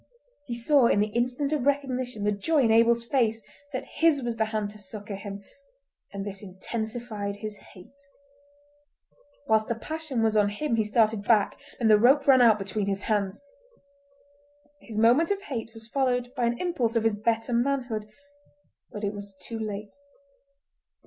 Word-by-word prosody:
He 240 - -3
saw 245 +2 +4
in 200 - +3
the 210 +1 +1
instant 250 +5 0
of 280 -3 0
recognition 255 -5 -1
the 210 - +2
joy 280 +10 +1
in 225 - +3
Abel's 230 +1 +4
face 225 -3 +1 0.3
that 260 -1 -4
his 320 -5 +2
was 235 -1 -3
the 220 - +2
hand 215 -2 -3
to 210 - -13
succour 205 +1 -5
him, 200 0 -7 0.7
and 200 0 -5
this 195 -1 -6
intensified 215 +1 -5
his 210 0 -7 0.2
hate. 230 +10 -16 1.5
Whilst 220 0 +3
the 235 - -1
passion 300 -1 -3
was 220 -1 +2
on 205 -1 +4
him 230 +5 -1
he 220 - +2
started 215 -1 +2
back, 210 -1 +2 0.2
and 230 - +2
the 215 -1 +6
rope 270 +5 +5
ran 265 -2 +6
out 225 -3 +6
between 200 0 -3
his 195 0 -2
hands. 205 +2 -1 1.4
His 220 -3 -9
moment 240 +9 +4
of 400 -1 -1
hate 235 - -5
was 225 0 -11
followed 250 -1 0
by 240 - 0
an 240 0 -1
impulse 255 -10 -1
of 230 - +2
his 225 -1 +2
better 225 +2 0
manhood, 240 -4 -1 0.8
but 210 - -7
it 200 0 -1
was 200 -1 -8
too 225 +5 -6
late. 210 -1 -5
225 Hz, 170 wpm, -27 LUFS, 210-250 Hz, 1.5 s, the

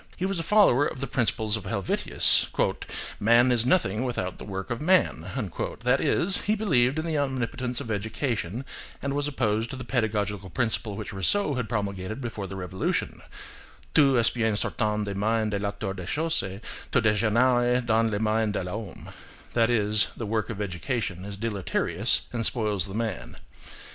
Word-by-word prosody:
He 185 - -1
was 195 -2 -1
a - - 0
follower 165 - +4
of - - -6
the 135 - -2
principles 110 -4 +1
of 110 -3 -6
Helvetius: 100 -1 +2 0.7
"Man 120 +4 +5
is 120 0 +3
nothing 125 - +2
without 105 -8 -3
the - - -5
work 95 +3 -5
of 115 - -3
man"; 155 - +2 0.5
that - - +2
is, 190 +3 +3
he 215 - +2
believed 140 - +2
in 155 - -1
the 160 -3 0
omnipotence 125 -2 -2
of 125 -5 -5
education, 110 +1 -2 0.3
and 140 0 -2
was 145 0 0
opposed 110 -5 0
to - - -5
the 130 - -6
pedagogical 105 -5 -1
principle 110 -1 -1
which - - -6
Rousseau 145 - +1
had 125 -5 -3
promulgated 100 0 -3
before 115 -6 -5
the 95 - -7
Revolution: 95 0 -2 0.7
"Tout 140 -4 +5
est 115 -1 +3
bien 110 -3 +1
sortant 105 0 0
des 100 - -3
mains 110 +2 0
de 100 - -1
l'Auteur 100 -1 -3
des 90 -3 -7
choses, 160 - 0 0.5
tout - - +3
dégénère 120 +3 +3
dans 115 0 +3
les 105 - -1
mains 110 0 +1
de 100 - -2
l'homme,"–that 110 +3 -4
is, 105 -2 +3
the 115 - -4
work 110 0 -1
of 110 -3 -5
education 95 - -3
is 100 0 -7
deleterious 100 -1 0
and 115 -1 -1
spoils 105 -6 0
the 95 - -7
man. 110 -4 -4
110 Hz, 170 wpm, -26 LUFS, 100-125 Hz, 0.7 s, Man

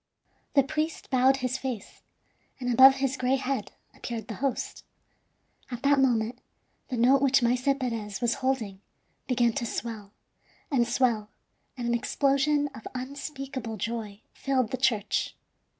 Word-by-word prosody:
The 275 - +6
priest 305 +2 -3
bowed 260 +1 +4
his 255 +1 -1
face, 250 -6 -6 0.6
and 245 -1 -1
above 265 +3 +9
his 270 -1 0
gray 255 +1 +2
head 260 -5 -3 0.2
appeared 230 -2 -6
the - - -3
host. 275 -2 -2 0.9
At 245 0 -6
that 280 0 +4
moment 245 -2 +1 0.5
the 250 - -3
note 260 +4 +5
which 270 -2 +4
Maese 245 +1 +2 0.2
Perez 225 -5 -3
was 235 -1 +1
holding 225 -8 -1 0.5
began 240 -2 +2
to 260 - -2
swell 220 -3 -5 0.6
and 240 -4 +3
swell, 235 -4 +1 0.5
and 240 -1 -3
an 235 - +1
explosion 280 +4 +2
of 220 - -9
unspeakable 265 -3 -5
joy 220 -1 -4
filled 260 -5 0
the 260 - -1
church. 235 -5 0
250 Hz, 140 wpm, -28 LUFS, 230-270 Hz, 0.9 s, above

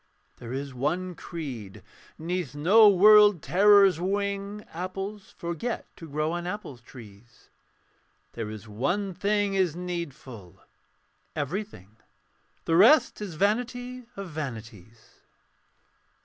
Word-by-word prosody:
There 120 -1 -9
is 135 +1 -5
one 175 +8 -2
creed: 130 - -8 0.3
'neath 165 -4 -4
no 205 +9 +6
world 205 -1 +6
terror's 195 -2 +5
wing 200 +2 -3
Apples 195 +4 -6
forget 170 +8 -4
to 165 - -11
grow 155 +2 -1
on 175 0 -4
apple 180 - -6
trees. 115 -1 -16 0.8
There 115 -2 -5
is 110 0 -9
one 175 - -2
thing 205 +1 0
is 185 -5 +1
needful 145 - -7 0.8
everything 145 - -5 0.7
The 165 - +1
rest 235 - +5
is 195 -6 -6
vanity 245 +6 -2
of 195 -3 -7
vanities. 115 - -9
175 Hz, 105 wpm, -26 LUFS, 130-200 Hz, 0.8 s, no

